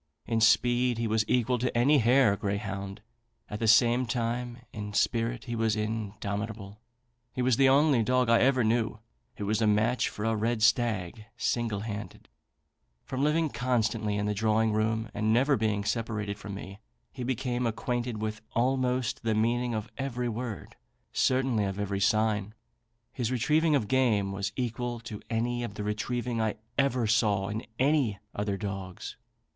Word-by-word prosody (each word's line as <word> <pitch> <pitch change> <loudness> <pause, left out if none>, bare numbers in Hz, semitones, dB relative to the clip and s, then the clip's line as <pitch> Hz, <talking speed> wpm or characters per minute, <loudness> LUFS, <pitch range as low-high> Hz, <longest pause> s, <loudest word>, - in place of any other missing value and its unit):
In 115 0 0
speed 120 +2 +3
he 115 - -1
was 110 0 +2
equal 125 0 +1
to 125 0 -1
any 140 +5 +5
hare 120 -2 +4
greyhound; 100 0 -4 0.5
at 105 - -4
the 115 - 0
same 120 +2 +5
time, 120 0 -2 0.2
in 105 -1 -6
spirit 115 +1 0
he 120 -2 -4
was 110 -1 +1
indomitable. 105 -1 -4 0.5
He 125 - -1
was 125 -1 +3
the 135 +2 +5
only 140 -2 +4
dog 125 +2 +2
I 115 0 +5
ever 130 -1 +3
knew 110 0 +1 0.4
who 105 - -4
was 110 +2 0
a 110 - +3
match 110 +4 +2
for 105 - -5
a 115 0 +1
red 110 +1 0
stag, 110 -3 +1
single 115 -4 -1
handed. 105 -1 -7 0.8
From 130 0 -3
living 155 +2 +2
constantly 115 -5 0
in 100 - -1
the 105 - 0
drawing 110 +1 +1
room, 110 +1 0
and 110 +1 0
never 135 +5 +4
being 105 -3 0
separated 105 -2 -2
from 100 -1 -7
me, 100 0 -9 0.3
he 125 - -6
became 125 -1 -1
acquainted 120 0 -2
with 110 0 -4
almost 125 0 0
the 110 -1 0
meaning 120 +2 +1
of 110 0 -3
every 125 -2 -2
word 115 -2 -6 0.4
certainly 130 -5 +2
of 95 0 -3
every 100 -1 -2
sign. 110 -1 +1 0.6
His 125 -3 -2
retrieving 150 +5 +2
of 120 -7 0
game 110 -7 +2
was 100 +1 -3
equal 120 -1 -3
to 110 -3 -8
any 120 +1 -1
of 100 -4 -6
the 105 - -4
retrieving 115 +3 -2
I 110 -1 0 0.2
ever 130 -3 +1
saw 105 -3 +2
in 110 +2 -4
any 135 -6 +2 0.2
other 100 -1 -2
dogs. 95 -3 -6
115 Hz, 165 wpm, -28 LUFS, 105-125 Hz, 0.8 s, any